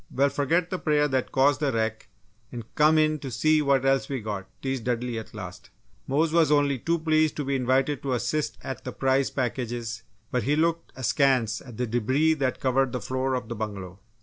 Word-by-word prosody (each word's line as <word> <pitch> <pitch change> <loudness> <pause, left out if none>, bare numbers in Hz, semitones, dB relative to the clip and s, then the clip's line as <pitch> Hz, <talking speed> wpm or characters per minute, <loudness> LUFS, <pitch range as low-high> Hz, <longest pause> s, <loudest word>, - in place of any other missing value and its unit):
"Well, 140 +2 +2
forget 165 +6 0
the 185 - -2
prayer 150 -2 +2
that 130 -2 -1
caused 135 +1 +3
the 145 -3 +1
wreck, 110 -1 -2 0.4
and 120 -3 -7
come 155 +1 +4
in 155 0 +2
to 135 - -6
see 155 +6 +2
what 140 -2 +2
else 135 0 +2
we 135 -2 -2
got," 105 -3 -5 0.2
teased 135 -3 -2
Dudley, 120 -1 -1
at 110 - -11
last. 90 -3 -9 0.4
Mose 155 +4 +1
was 165 -3 +4
only 145 -3 +2
too 170 +7 0
pleased 155 -1 +2
to 145 - -3
be 140 0 0
invited 130 +2 +1
to 135 -2 -2
assist 125 +6 -1
at 130 - -6
the - - -6
prize 135 0 +1
packages 120 -3 -3 0.3
but 125 - +1
he 145 +5 +1
looked 165 +1 0
askance 130 -3 +1
at 120 -4 -12
the 125 - 0
debris 130 +7 +2
that 135 -5 -1
covered 130 -1 +1
the 125 - -1
floor 130 +3 -1
of 125 -2 -4
the 115 - -4
bungalow. 100 -4 -6
130 Hz, 205 wpm, -26 LUFS, 120-150 Hz, 0.4 s, come